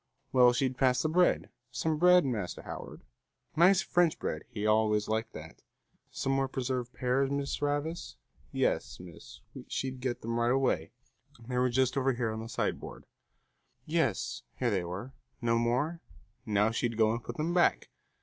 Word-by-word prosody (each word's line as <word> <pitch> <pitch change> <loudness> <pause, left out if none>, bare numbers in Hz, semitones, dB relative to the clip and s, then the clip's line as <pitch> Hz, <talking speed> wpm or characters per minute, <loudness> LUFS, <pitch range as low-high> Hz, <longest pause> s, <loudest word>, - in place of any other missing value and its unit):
Well, 125 -1 +6
she'd 130 0 -1
pass 130 -1 +3
the 155 - +1
bread. 180 +3 +2 0.2
Some 150 +5 -1
bread, 180 0 +6
Master 110 -9 -3
Howard? - - -8 0.5
Nice 185 +4 +5
French 175 -2 +2
bread, - - -4
he 105 -4 -4
always 105 -1 +2
liked 110 +1 -1
that. 80 +1 -10 0.5
Some 135 - -2
more 135 0 +1
preserved 125 -2 -3
pears, 130 +2 0
Miss 140 0 -2
Ravis? 145 +3 -2 0.4
Yes, 65 - -1
miss, 90 -3 -12 0.3
she'd 130 -1 -4
get 125 -1 -2
them 115 +1 -2
right 120 0 +2
away; 135 +1 +1 0.6
they 125 -1 -1
were 125 0 +3
just 130 +2 +1
over 135 0 +2
here 120 -2 -1
on 110 - -4
the 115 - -7
sideboard. - - -3 0.8
Yes, - - -1 0.2
here 120 -2 0
they 95 -3 0
were. 95 +10 -6 0.3
No 115 -1 +1
more? 130 +9 0 0.5
Now 105 +1 +2
she'd 115 0 -1
go 110 -1 +4
and 115 +1 -3
put - - -7
them 160 +3 -1
back. 175 -1 +2
125 Hz, 165 wpm, -30 LUFS, 115-140 Hz, 0.8 s, Well